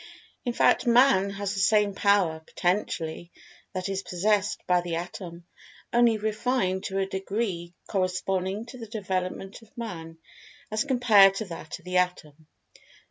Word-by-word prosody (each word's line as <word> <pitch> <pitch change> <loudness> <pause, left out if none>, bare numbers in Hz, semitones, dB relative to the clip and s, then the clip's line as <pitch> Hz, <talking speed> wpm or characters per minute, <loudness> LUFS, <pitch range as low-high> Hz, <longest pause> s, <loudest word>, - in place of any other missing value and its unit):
In 245 - -1
fact, 245 - +3
Man 235 -5 +5
has 200 0 -3
the 200 - -3
same 205 +1 +3
power, 195 -5 +2
potentially, 170 -1 -2 0.4
that 185 0 -3
is 195 -1 -2
possessed 205 +3 0
by 180 -1 +3
the 175 -1 -3
Atom, 170 0 -7 0.5
only 235 -2 +4
refined 215 -2 -1
to 195 - -3
a 195 - +1
degree 190 -3 -3
corresponding 190 +2 -1
to 255 +1 -11
the 225 - -7
development 195 -2 -4
of 225 +4 -21
Man 165 -8 -6 0.5
as 215 +5 0
compared 220 -7 +6
to 220 - -3
that 165 -3 -7
of - - -22
the 180 0 -1
Atom. 160 -4 -2
195 Hz, 145 wpm, -27 LUFS, 180-215 Hz, 0.5 s, compared